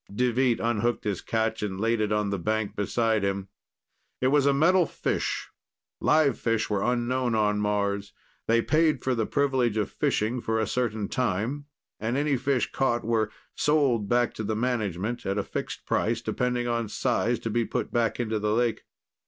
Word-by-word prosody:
Deveet 125 Hz, +2 st, +1 dB
unhooked 120 Hz, 0 st, 0 dB
his 100 Hz, -4 st, -2 dB
catch 110 Hz, 0 st, -1 dB
and 95 Hz, -3 st, -3 dB
laid 115 Hz, +1 st, +1 dB
it 105 Hz, -1 st, 0 dB
on 105 Hz, -1 st, +1 dB
the 100 Hz, -, -1 dB
bank 110 Hz, +3 st, -1 dB
beside 110 Hz, +1 st, +1 dB
him. 100 Hz, -1 st, -2 dB, 0.7 s
It 130 Hz, -, +2 dB
was 140 Hz, 0 st, +3 dB
a -, -, +6 dB
metal 170 Hz, +5 st, +4 dB
fish: -, -, -2 dB, 0.5 s
live 150 Hz, -4 st, +3 dB
fish 115 Hz, -2 st, 0 dB
were 100 Hz, -2 st, +1 dB
unknown 120 Hz, 0 st, 0 dB
on 105 Hz, -1 st, +2 dB
Mars. 100 Hz, -1 st, -1 dB, 0.4 s
They 115 Hz, +1 st, +3 dB
paid 155 Hz, -3 st, +2 dB
for 130 Hz, -, +1 dB
the 115 Hz, -3 st, -1 dB
privilege 130 Hz, -6 st, +1 dB
of 105 Hz, -, -1 dB
fishing 115 Hz, +4 st, 0 dB
for 110 Hz, -1 st, 0 dB
a 110 Hz, -, +1 dB
certain 110 Hz, -5 st, -1 dB
time 125 Hz, +5 st, -1 dB, 0.3 s
and 115 Hz, +4 st, -1 dB
any 145 Hz, 0 st, +2 dB
fish 130 Hz, 0 st, 0 dB
caught 120 Hz, -3 st, 0 dB
were 110 Hz, -1 st, +1 dB, 0.2 s
"sold" 135 Hz, -9 st, +2 dB
back 120 Hz, 0 st, +2 dB
to 110 Hz, -, -5 dB
the 110 Hz, +1 st, -1 dB
management 110 Hz, -2 st, -1 dB
at 95 Hz, +1 st, -1 dB
a 100 Hz, -, 0 dB
fixed -, -, -5 dB
price, 115 Hz, +1 st, 0 dB
depending 125 Hz, 0 st, -1 dB
on 115 Hz, -2 st, -1 dB
size, 120 Hz, +1 st, 0 dB
to 115 Hz, -, -4 dB
be 120 Hz, +2 st, +1 dB
put 110 Hz, -, -3 dB
back 115 Hz, -1 st, +1 dB
into 110 Hz, -2 st, -1 dB
the 105 Hz, +1 st, 0 dB
lake. 120 Hz, -1 st, 0 dB
115 Hz, 180 wpm, -27 LUFS, 105-125 Hz, 0.7 s, a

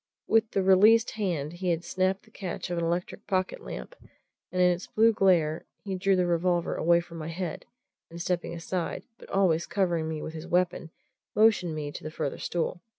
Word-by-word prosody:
With 225 Hz, 0 st, +3 dB
the 195 Hz, -, 0 dB
released 210 Hz, +5 st, +6 dB
hand 175 Hz, -8 st, -2 dB
he 180 Hz, +1 st, -3 dB
had 170 Hz, 0 st, 0 dB
snapped 185 Hz, +2 st, 0 dB
the -, -, -22 dB
catch 185 Hz, -2 st, -5 dB
of 175 Hz, -, -1 dB
an -, -, -1 dB
electric 175 Hz, +2 st, -3 dB
pocket 185 Hz, -1 st, 0 dB
lamp, 60 Hz, -, -8 dB, 0.6 s
and 185 Hz, -, -2 dB
in 180 Hz, 0 st, +6 dB
its 175 Hz, +1 st, -3 dB
blue 225 Hz, +1 st, +4 dB
glare 170 Hz, -6 st, +2 dB, 0.2 s
he 195 Hz, -, -4 dB
drew 190 Hz, +1 st, +2 dB
the 180 Hz, -1 st, +2 dB
revolver 175 Hz, 0 st, +1 dB
away 170 Hz, +1 st, +3 dB
from 170 Hz, -1 st, -10 dB
my 155 Hz, -, -5 dB
head, 170 Hz, 0 st, -5 dB, 0.4 s
and 170 Hz, +1 st, -9 dB
stepping 175 Hz, -1 st, -2 dB
aside, 170 Hz, +1 st, -3 dB, 0.2 s
but -, -, -14 dB
always 175 Hz, -4 st, +2 dB
covering 170 Hz, -5 st, 0 dB
me 160 Hz, -1 st, -3 dB
with 155 Hz, -, -6 dB
his 160 Hz, +1 st, -7 dB
weapon, 175 Hz, -1 st, 0 dB, 0.5 s
motioned 210 Hz, -7 st, +4 dB
me 150 Hz, -1 st, -4 dB
to -, -, -9 dB
the 155 Hz, -, -4 dB
further 155 Hz, -3 st, -4 dB
stool. 175 Hz, +1 st, -2 dB
175 Hz, 200 wpm, -28 LUFS, 165-190 Hz, 0.6 s, released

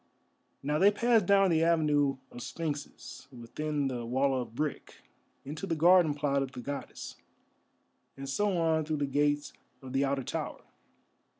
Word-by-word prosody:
Now 150 Hz, +2 st, 0 dB
they 195 Hz, -, +7 dB
passed 225 Hz, -1 st, +2 dB
down 195 Hz, -2 st, +5 dB
the 160 Hz, 0 st, +3 dB
avenue 150 Hz, -4 st, +2 dB
of 120 Hz, -, -9 dB
sphinxes 150 Hz, 0 st, -6 dB
within 140 Hz, +4 st, -3 dB
the 125 Hz, -3 st, -3 dB
wall 130 Hz, +4 st, +1 dB
of 120 Hz, -1 st, -9 dB
brick, 150 Hz, +1 st, -4 dB, 0.4 s
into 155 Hz, +7 st, -5 dB
the 165 Hz, -, 0 dB
garden 170 Hz, -1 st, +5 dB
plot 140 Hz, -1 st, 0 dB
of 135 Hz, -1 st, -4 dB
the -, -, -7 dB
Goddess, 140 Hz, +3 st, -6 dB, 1.0 s
and 135 Hz, 0 st, -7 dB
so 195 Hz, +7 st, 0 dB
on 160 Hz, -1 st, +2 dB
through 155 Hz, 0 st, -2 dB
the 145 Hz, -, 0 dB
gates 145 Hz, +1 st, 0 dB, 0.3 s
of 130 Hz, -1 st, -10 dB
the 135 Hz, +1 st, +2 dB
outer 140 Hz, -1 st, 0 dB
tower. -, -, -5 dB
145 Hz, 160 wpm, -30 LUFS, 135-165 Hz, 1.0 s, they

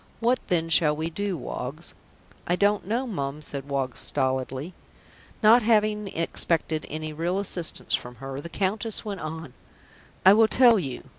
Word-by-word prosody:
What 245 Hz, +2 st, +2 dB
then 165 Hz, -2 st, +1 dB
shall 155 Hz, -2 st, +4 dB
we 160 Hz, +2 st, -3 dB
do, 200 Hz, 0 st, -2 dB
Woggs?" 140 Hz, +4 st, -6 dB, 0.5 s
"I 175 Hz, -, +2 dB
don't 205 Hz, +1 st, +1 dB
know, 235 Hz, +5 st, 0 dB
Mum," 150 Hz, -, -4 dB
said 140 Hz, -1 st, -5 dB
Woggs 135 Hz, -3 st, -2 dB
stolidly. 130 Hz, +5 st, -1 dB, 0.7 s
Not 225 Hz, +3 st, +7 dB
having 215 Hz, -2 st, +2 dB
expected 165 Hz, -2 st, -1 dB
any 155 Hz, 0 st, -5 dB
real 170 Hz, +4 st, -1 dB
assistance 185 Hz, -4 st, -3 dB
from 125 Hz, 0 st, -2 dB
her, 135 Hz, +2 st, -7 dB
the 170 Hz, -, -8 dB
Countess 205 Hz, +5 st, -1 dB
went 200 Hz, -3 st, -4 dB
on, 155 Hz, -3 st, -6 dB, 0.7 s
"I 190 Hz, -, +9 dB
will 220 Hz, +1 st, +5 dB
tell 235 Hz, -1 st, +5 dB
you. 135 Hz, -7 st, -5 dB
170 Hz, 155 wpm, -26 LUFS, 145-210 Hz, 0.7 s, I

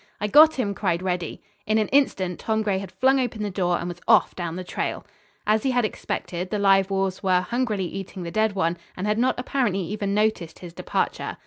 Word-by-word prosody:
"I -, -, -1 dB
got 305 Hz, +8 st, +7 dB
him!" 210 Hz, -6 st, -1 dB
cried 185 Hz, -3 st, -1 dB
Reddy. 180 Hz, -3 st, -3 dB, 0.2 s
In 215 Hz, +1 st, +2 dB
an 215 Hz, -, +1 dB
instant 190 Hz, -10 st, +1 dB
Tom 220 Hz, -1 st, 0 dB
Gray 200 Hz, -3 st, 0 dB
had 195 Hz, -2 st, -8 dB
flung 265 Hz, +8 st, +3 dB
open 230 Hz, -4 st, -2 dB
the 205 Hz, -, -2 dB
door 180 Hz, -2 st, 0 dB
and -, -, -4 dB
was 175 Hz, 0 st, -7 dB
off 225 Hz, -2 st, +4 dB
down 170 Hz, -2 st, -4 dB
the 185 Hz, -, -5 dB
trail. -, -, -4 dB, 0.4 s
As 215 Hz, +1 st, +3 dB
he 265 Hz, -, 0 dB
had 245 Hz, -3 st, +2 dB
expected, 180 Hz, -3 st, -4 dB
the 210 Hz, -, -1 dB
live 195 Hz, -1 st, +4 dB
wolves 195 Hz, -1 st, -1 dB
were 185 Hz, -1 st, +3 dB
hungrily 220 Hz, -2 st, -1 dB
eating 190 Hz, 0 st, -6 dB
the 170 Hz, -, -5 dB
dead 215 Hz, +2 st, +1 dB
one 175 Hz, -3 st, 0 dB, 0.2 s
and 185 Hz, -, -3 dB
had 210 Hz, +1 st, +1 dB
not 255 Hz, +2 st, +2 dB
apparently 250 Hz, -7 st, 0 dB
even 200 Hz, +2 st, -2 dB
noticed 210 Hz, -6 st, 0 dB
his 175 Hz, -2 st, -10 dB
departure. -, -, -2 dB
195 Hz, 220 wpm, -24 LUFS, 180-220 Hz, 0.4 s, got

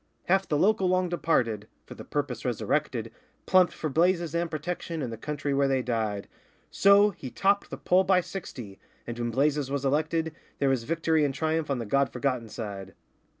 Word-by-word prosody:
Half 190 Hz, +1 st, +2 dB
the 150 Hz, -, +1 dB
local 195 Hz, +2 st, +3 dB
long 185 Hz, 0 st, +2 dB
departed 115 Hz, -11 st, 0 dB, 0.2 s
(for -, -, -10 dB
the -, -, -10 dB
purpose -, -, -3 dB
resurrected) -, -, -1 dB, 0.3 s
Plumped 185 Hz, -2 st, +5 dB
for 155 Hz, -, -4 dB
Blazes 170 Hz, +2 st, +1 dB
and 170 Hz, 0 st, 0 dB
Protection, 165 Hz, +1 st, -4 dB
and 125 Hz, -6 st, -3 dB
the -, -, -4 dB
country 145 Hz, +4 st, -3 dB
where 140 Hz, 0 st, +3 dB
they 135 Hz, -1 st, +1 dB
died; 110 Hz, -4 st, -2 dB, 0.4 s
So 200 Hz, +1 st, +5 dB
he 130 Hz, -, -8 dB
topped 200 Hz, +8 st, +1 dB
the -, -, -6 dB
poll 185 Hz, +1 st, +3 dB
by 185 Hz, -1 st, +3 dB
sixty, 120 Hz, -, -8 dB, 0.3 s
and 120 Hz, 0 st, -6 dB
when 120 Hz, 0 st, -1 dB
Blazes 140 Hz, +3 st, +1 dB
was 140 Hz, 0 st, -2 dB
elected 160 Hz, +3 st, 0 dB, 0.2 s
There 140 Hz, -, +2 dB
was 130 Hz, -4 st, 0 dB
victory 160 Hz, 0 st, +1 dB
and 140 Hz, -2 st, 0 dB
triumph 160 Hz, +1 st, -1 dB
on 140 Hz, -, 0 dB
the 115 Hz, -, -4 dB
God 140 Hz, +6 st, +1 dB
Forgotten 125 Hz, -5 st, -2 dB
side. 100 Hz, -4 st, -7 dB
150 Hz, 190 wpm, -27 LUFS, 125-175 Hz, 0.4 s, Plumped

